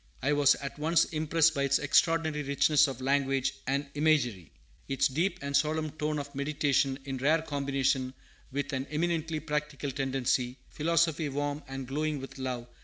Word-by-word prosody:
I 145 +3 +2
was 145 -1 +5
at 140 +1 -7
once 165 +2 +3
impressed 160 +1 +2
by 140 - -1
its 140 0 +3
extraordinary 160 +1 +2
richness 145 +2 +3
of 130 -2 -6
language 135 0 +1
and 140 +2 0
imagery, 130 - +1 0.4
its 135 - +2
deep 165 +9 0
and 140 0 -2
solemn 155 +2 +1
tone 150 0 -2
of 145 -1 -6
meditation 140 -1 +1
in 135 -1 -4
rare 155 +5 +2
combination 135 -3 -1 0.4
with 145 +1 -3
an 130 +1 -2
eminently 160 0 -1
practical 150 -2 -3
tendency, 130 -1 -1
philosophy 165 -1 +1
warm 145 +1 -2
and 135 0 -5
glowing 150 +2 -1
with 135 0 -9
love. 125 -2 -3
145 Hz, 160 wpm, -29 LUFS, 135-155 Hz, 0.4 s, was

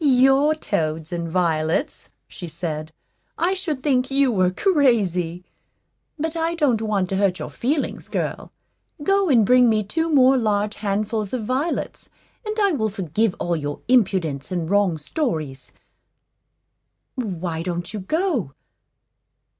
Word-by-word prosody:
"Your 270 +2 +4
toads 160 - -2
and 170 -1 -3
violets!" 165 - 0 0.2
she 175 - -9
said; 155 -1 -5 0.5
"I 355 +3 +1
should 315 -8 -4
think 260 -3 +2
you 275 -1 +3
were 185 -4 +3
crazy. 185 - +1 0.7
But 320 +2 -3
I 330 +1 0
don't 265 -9 +2
want 205 -4 0
to 190 - -1
hurt 195 -2 +2
your 155 - -6
feelings, 280 +5 -2
girl. - - -3 0.5
Go 390 +1 +2
and 235 -6 +5
bring 250 +1 +5
me 215 -1 +2
two 325 +11 -1
more 265 -3 +5
large 210 -2 0
handfuls 210 +1 -2
of 240 -4 -2
violets, 270 +8 -2 0.3
and 430 0 -3
I 400 -2 +3
will 220 -9 0
forgive 195 +1 -1
all 175 0 -1
your 145 -2 -4
impudence 185 - +1
and 175 -3 -2
wrong 200 -5 +3
stories. 155 - -3 1.4
Why 180 -9 -3
don't 175 +2 -4
you 215 - -3
go? 265 - -1
215 Hz, 140 wpm, -22 LUFS, 175-275 Hz, 1.4 s, and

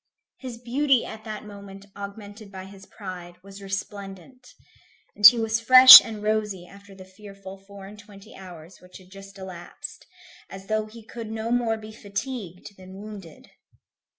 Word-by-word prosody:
His 255 -3 -9
beauty, 255 +2 0
at 220 0 -11
that 215 -1 -8
moment 200 -1 -13
augmented 205 +1 -11
by 190 -1 -10
his 195 0 -15
pride, 180 -4 -11
was 195 0 -14
resplendent, 195 +4 -9 0.6
and 205 - +9
he 245 - +5
was 225 0 -2
fresh 255 +2 +10
and 215 -2 -9
rosy 210 -4 -3
after 200 +1 -17
the 190 -1 -14
fearful 195 0 -14
four 200 -1 -13
and 205 +2 -14
twenty 205 -2 -16
hours 175 -2 -14
which 180 0 -15
had 185 -1 -20
just 195 0 -14
elapsed, 185 -2 -11 0.4
as 195 0 -12
though 215 +1 -3
he 220 0 -15
could 230 -1 -10
no 220 +1 -5
more 235 -2 -1
be 215 0 -12
fatigued 205 -3 -8
than 185 0 -14
wounded. 200 -5 -13
200 Hz, 160 wpm, -23 LUFS, 195-220 Hz, 0.6 s, fresh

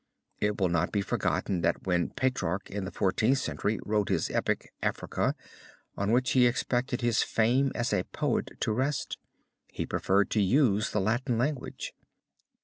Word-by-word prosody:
It 105 0 0
will 95 -2 +2
not 85 -2 +1
be 100 - +1
forgotten 90 -1 -1
that 85 - 0
when 90 -2 +1
Petrarch 100 -8 -1
in 100 -1 -3
the 95 - -5
Fourteenth 110 +7 +2
Century 110 -4 -1
wrote 105 -1 +1
his 95 -5 0
epic, - - -1
Africa, - - -1 0.6
on 100 +1 -1
which 125 +2 +2
he 125 -2 +5
expected 125 0 -1
his 120 -1 +2
fame 125 +5 +2
as 120 +2 0
a - - +2
poet - - -2
to - - +1
rest, 130 +5 -1 0.5
he - - -4
preferred 100 +2 +1
to 110 - +2
use 110 0 +3
the 105 - 0
Latin 120 +4 0
language. 130 +2 -2
110 Hz, 160 wpm, -29 LUFS, 100-125 Hz, 0.6 s, he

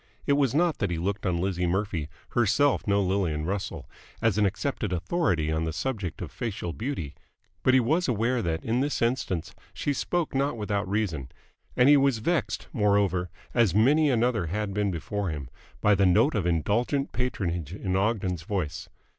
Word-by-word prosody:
It 140 - +3
was 140 -2 +2
not 170 -1 +2
that - - 0
he 85 - -2
looked 100 +4 -2
on 90 -2 +1
Lizzie 90 0 0
Murphy, 90 -4 -1 0.2
herself 120 +4 +2
no 100 0 +3
Lillian 90 -5 0
Russell, 95 +2 -4 0.3
as 115 -4 +2
an 105 - +4
accepted 105 0 -2
authority 90 - 0
on 80 +1 0
the 80 - -1
subject 90 - -3
of - - -7
facial 100 -7 -4
beauty; 85 - -4 0.5
but 130 +4 +4
he - - +7
was 155 +9 +1
aware 120 +1 +1
that 80 -4 -2
in 115 +2 +1
this 145 +2 0
instance 115 -8 -1 0.2
she 145 - -1
spoke 170 +4 -1
not 140 -1 0
without 105 -2 -2
reason, 85 - -2 0.5
and 125 - +6
he 145 0 +8
was 135 -3 +3
vexed, 165 +10 -1
moreover, 100 - +2 0.2
as 110 -7 +3
many 145 +8 +4
another 120 -6 +1
had 100 +3 -2
been 105 0 0
before 95 +3 -3
him, 70 -5 -6 0.3
by 105 - +5
the 100 -1 +4
note 110 - +4
of 100 -6 0
indulgent 110 - 0
patronage 90 - -2
in 95 -1 -3
Ogden's 95 -4 0
voice. 85 -3 -3
100 Hz, 180 wpm, -27 LUFS, 90-125 Hz, 0.5 s, he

